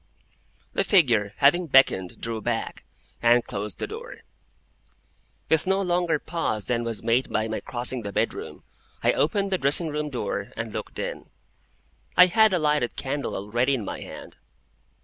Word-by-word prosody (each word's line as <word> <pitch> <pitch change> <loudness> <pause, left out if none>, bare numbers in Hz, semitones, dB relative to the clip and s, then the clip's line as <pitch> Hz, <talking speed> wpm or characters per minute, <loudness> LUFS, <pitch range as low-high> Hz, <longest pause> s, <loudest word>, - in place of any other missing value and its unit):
The - - +2
figure, 115 - +3
having 170 +5 +4
beckoned, 130 - +3
drew 115 -1 -4
back, 115 0 -3 0.4
and 120 0 +4
closed 105 +1 -5
the - - -3
door. 470 +3 -9 1.3
With 160 +2 +2
no 190 +1 +2
longer 175 -3 +1
pause 125 - -3
than 120 0 0
was 115 -3 -4
made 120 +3 +1
by 110 +1 0
my 110 - -3
crossing 125 0 -1
the 100 -2 -5
bedroom, - - -3 0.4
I - - +4
opened 195 +6 0
the 190 - +1
dressing 145 +4 +1
room 150 0 -3
door, 125 -4 -4
and - - -4
looked - - -6
in. - - -5 0.9
I 180 - +10
had 220 +4 +4
a 185 - +2
lighted 150 -6 +1
candle 140 +1 -3
already 120 +7 0
in 115 -6 -4
my - - -5
hand. - - -10
135 Hz, 160 wpm, -25 LUFS, 115-175 Hz, 1.3 s, I